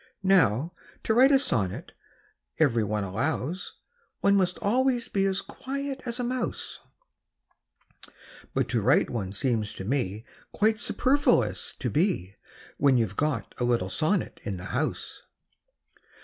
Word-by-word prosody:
Now, 165 - +3 0.3
to 220 - +1
write 260 +4 +6
a 275 - +7
sonnet, 115 - -1 0.7
every 125 -8 +3
one 105 0 -1
allows, 130 - -2 0.5
One 200 - +4
must 185 -2 +1
always 245 +2 +1
be 195 -1 0
as 195 0 0
quiet 275 0 -5
as 235 +1 -3
a - - 0
mouse; 250 0 -3 1.8
But - - +1
to - - +1
write - - +3
one 100 -6 -3
seems 110 0 -1
to 95 - -6
me 110 -4 -2 0.3
Quite 215 +1 +2
superfluous 275 +4 +1
to - - -3
be, 150 - 0 0.4
When 135 -2 +4
you 115 - +3
've 100 - -13
got 140 -7 -1
a - - 0
little 120 -6 +1
sonnet 165 - 0
in 100 -2 -4
the 90 - -8
house. 145 +5 -3
155 Hz, 140 wpm, -27 LUFS, -, 1.8 s, a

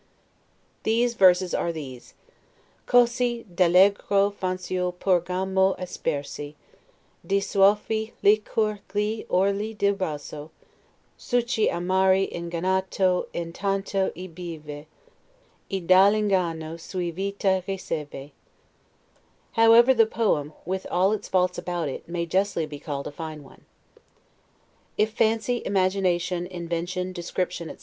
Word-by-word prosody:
These 235 +2 +1
verses 185 -3 +4
are 170 - 0
these: 135 -6 -9 0.7
"Cosi 240 -1 +2
all'egro 195 +3 +4
fanciul 185 -1 -2
porgiamo 190 +1 +1
aspersi 145 -4 -4 0.7
Di 200 0 +1
soavi 210 +3 +2
licor 215 0 +2 0.2
gli 210 +2 -1
orli 200 +4 +1
del 200 0 +2
vaso: 150 -5 -5 0.7
Succhi 240 -2 +1
amari 190 +2 +2
ingannato 180 +2 0
intanto 195 +3 -2
ei 180 +3 -7
beve, 160 -4 -8 0.8
E 195 - -1
dall' 185 +4 +6
inganno 170 -6 -1
suo 175 0 -4
vita 195 +1 0
riceve." 150 -7 -5 1.2
However, 230 +3 +6
the 225 -3 +4
poem, 155 -11 0
with 190 +2 -3
all 185 +3 +2
its 215 -1 -3
faults 180 -1 +1
about 175 -3 -3
it, 135 - -8
may 170 0 -2
justly 185 -1 0
be 150 -1 -9
called 140 -2 -5
a - - -5
fine 155 -1 -7
one. 135 - -18 1.3
If 215 +1 +2
fancy, 225 +2 +1
imagination, 185 -2 0
invention, 175 +1 -4
description, 175 -1 -3
etc. - - -10
185 Hz, 110 wpm, -25 LUFS, 170-200 Hz, 1.3 s, dall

